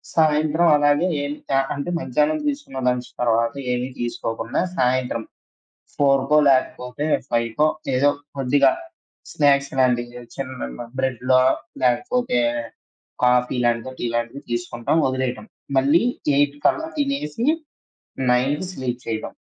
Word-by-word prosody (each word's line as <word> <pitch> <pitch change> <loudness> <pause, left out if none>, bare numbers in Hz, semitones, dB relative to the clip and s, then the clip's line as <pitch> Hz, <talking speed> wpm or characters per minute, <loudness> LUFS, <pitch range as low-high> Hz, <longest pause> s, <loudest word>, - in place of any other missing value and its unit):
సాయంత్రం 155 +1 +3
అలాగే 145 +4 +3 0.2
ఏం 145 - -3 0.2
త - - -3
ఆహ్, 135 - 0
అంటే 140 +4 -4
మధ్యాహ్నం 305 - +1
తీసుకున్న 285 - -4
లంచ్ 125 0 0
తర్వాత 115 -1 +2 0.2
ఏమి 125 +1 -1
తీసుకోకుండా 115 -1 -3 0.2
సాయంత్రం 125 -2 +1 0.7
4కో, 135 +1 +3
లేకపోతే 130 +1 0 0.2
5కో 115 +5 +1 0.3
ఏదో 140 +3 +4 0.3
కొద్దిగా 135 +1 +4 0.6
స్నాక్స్ 140 -1 +3
లాంటివి 120 -1 +1
చిన్న 130 - -6 0.2
బ్రెడ్‌లో 130 0 +2 0.4
లేకపోతే, 145 - +1 0.8
కాఫీ 125 +1 +3
లాంటిదో, 120 +2 0
టీ - - -2
లాంటిదో 120 +4 -2
తీసుకుంటాం 120 +4 -1
ఒదిలేయటం. 130 -4 -2 0.3
మళ్ళీ 145 +6 +4 0.3
8 145 0 +2
కల్లా 320 0 +2
తినేసి 275 - -1 0.9
9కి 140 +8 +1
స్లీప్ 125 -3 -4
చేయటం. 110 -1 -4
130 Hz, 110 wpm, -22 LUFS, 120-145 Hz, 0.9 s, ఏదో